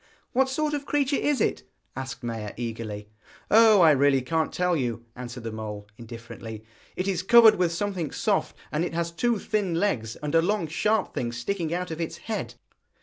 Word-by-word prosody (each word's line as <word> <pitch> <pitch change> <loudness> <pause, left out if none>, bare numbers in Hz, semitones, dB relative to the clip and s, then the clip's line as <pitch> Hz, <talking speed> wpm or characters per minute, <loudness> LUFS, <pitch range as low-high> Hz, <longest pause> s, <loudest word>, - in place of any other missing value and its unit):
'What 265 +1 +3
sort 300 +3 -1
of 290 -1 -3
creature 285 -1 +1
is 290 -2 +1
it?' - - 0 0.3
asked 135 -1 -6
Maia 115 -3 -4
eagerly. 110 -3 -5 0.4
'Oh, 220 -2 +7
I 160 -2 +7
really 140 -2 +3
can't 160 +4 0
tell 180 -1 +1
you,' 120 -5 -2
answered 125 -1 -7
the 115 - -4
mole, 105 -1 -6
indifferently; 115 -1 -9 0.3
'it 185 - -2
is 185 -3 0
covered 225 +3 +8
with 180 -2 +2
something 180 -3 -2
soft, - - -1 0.2
and 155 +2 0
it 175 - -3
has 170 0 -1
two 235 +6 +1
thin 205 -4 -1
legs, 120 - 0
and 150 -1 -5
a 165 - +5
long 200 +1 0
sharp 210 +8 0
thing 120 -1 -2
sticking 160 +8 -3
out 180 0 -2
of 160 +1 -4
its 165 - -4
head.' 225 -1 -5
165 Hz, 190 wpm, -26 LUFS, -, 0.4 s, covered